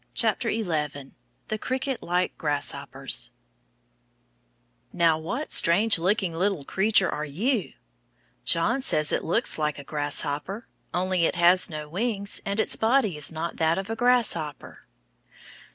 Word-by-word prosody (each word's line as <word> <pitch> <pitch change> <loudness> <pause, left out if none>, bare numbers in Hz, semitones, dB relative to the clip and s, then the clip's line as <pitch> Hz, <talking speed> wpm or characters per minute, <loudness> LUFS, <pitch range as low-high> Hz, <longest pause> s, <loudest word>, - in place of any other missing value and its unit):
Happy 225 - +1
katydids. 150 -6 -3 0.4
THE 215 - -3
CRICKET 260 +1 -3
LIKE 180 +1 -1
GRASSHOPPERS 145 -4 -1 1.6
Now 165 -2 +2
what 240 - -4
strange 200 +3 +5
looking 185 0 0
little 185 -2 -1
creature 195 +4 +3
are 150 - -3
you? 200 - -2 0.7
John 220 +11 +1
says 155 - +2
it - - 0
looks 225 +1 0
like 150 -1 -1
a 140 - -8
grasshopper, 145 - -2 0.3
only 185 -1 0
it - - 0
has 175 +2 +4
no 150 -2 -6
wings 200 +4 -2
and 200 +2 -1
its - - +3
body 225 - +2
is 150 +1 -4
not 165 +1 -5
that 160 +2 +1
of 195 +3 -4
a - - -2
grasshopper. 225 - 0
180 Hz, 135 wpm, -25 LUFS, 155-215 Hz, 1.6 s, strange